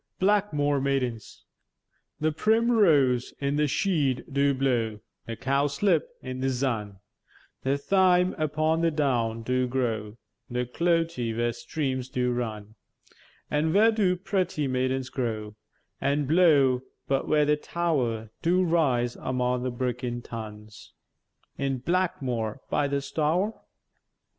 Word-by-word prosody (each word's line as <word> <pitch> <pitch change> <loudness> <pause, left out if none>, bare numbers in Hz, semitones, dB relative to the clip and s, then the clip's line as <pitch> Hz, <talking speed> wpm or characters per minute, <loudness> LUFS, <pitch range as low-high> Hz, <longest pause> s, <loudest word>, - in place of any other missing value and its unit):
BLACKMWORE 185 -9 +2
MAIDENS 130 -5 -2 0.8
The 155 +1 +1
primrwose 165 - +3
in 140 0 0
the 150 0 +2
sheäde 145 -5 0
do 140 0 +3
blow, 120 -5 0 0.3
The 115 - -4
cowslip 140 - +1 0.2
in 130 -1 -5
the 130 - 0
zun, 120 -6 -1 0.7
The 135 +1 0
thyme 180 +3 +3
upon 155 +1 +1
the 170 - +3
down 120 -7 0
do 125 +1 0
grow, 115 -4 -2 0.3
The 125 0 -1
clote 165 +3 0 0.2
where 120 0 0
streams 130 +1 -3
do 125 -1 0
run; 110 -3 -4 0.8
An' 155 +2 +1
where 220 +3 +6
do 200 -5 +2
pretty 185 -5 -1
maidens 130 0 -1
grow 110 -4 -3 0.5
An' 140 +1 +1
blow, 140 -5 +4 0.3
but 135 -1 0
where 150 -1 +3
the 150 0 +3
tow'r 130 -10 -2
Do 180 +2 +3
rise 135 -9 +1
among 125 -1 -1
the 130 - -1
bricken 125 -1 -3
tuns, 105 -2 -9 0.7
In 135 -1 0
Blackmwore 130 - -1
by 145 - +2
the 140 0 -1
Stour? 160 +9 -1
135 Hz, 125 wpm, -27 LUFS, 125-160 Hz, 0.8 s, where